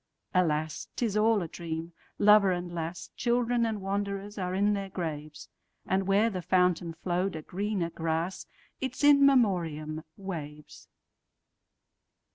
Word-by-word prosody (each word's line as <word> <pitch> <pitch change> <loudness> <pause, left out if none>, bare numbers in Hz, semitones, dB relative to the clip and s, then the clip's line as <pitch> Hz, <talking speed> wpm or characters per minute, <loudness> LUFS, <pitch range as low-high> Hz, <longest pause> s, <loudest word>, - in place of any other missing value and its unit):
Alas! 155 -4 0
't 245 - 0
is 210 -3 -2
all 215 -2 +3
a - - -4
dream. 165 0 -6 0.2
Lover 210 -2 +6
and 175 -1 -3
lass, 165 0 -5
Children 240 -1 +1
and 215 -3 -3
wanderers, 200 +1 -3
are 180 0 -2
in 205 +2 +3
their 195 -1 -3
graves; 155 -4 -5 0.4
And 190 0 0
where 205 +4 +3
the 185 -2 -3
fountain 180 -2 +1
flow'd 180 +1 -1
a 155 - -6
greener 190 -2 -2
grass—Its 165 - -4
In 285 -1 +7
Memoriam—waves. 160 - -1
185 Hz, 125 wpm, -29 LUFS, 165-205 Hz, 0.4 s, In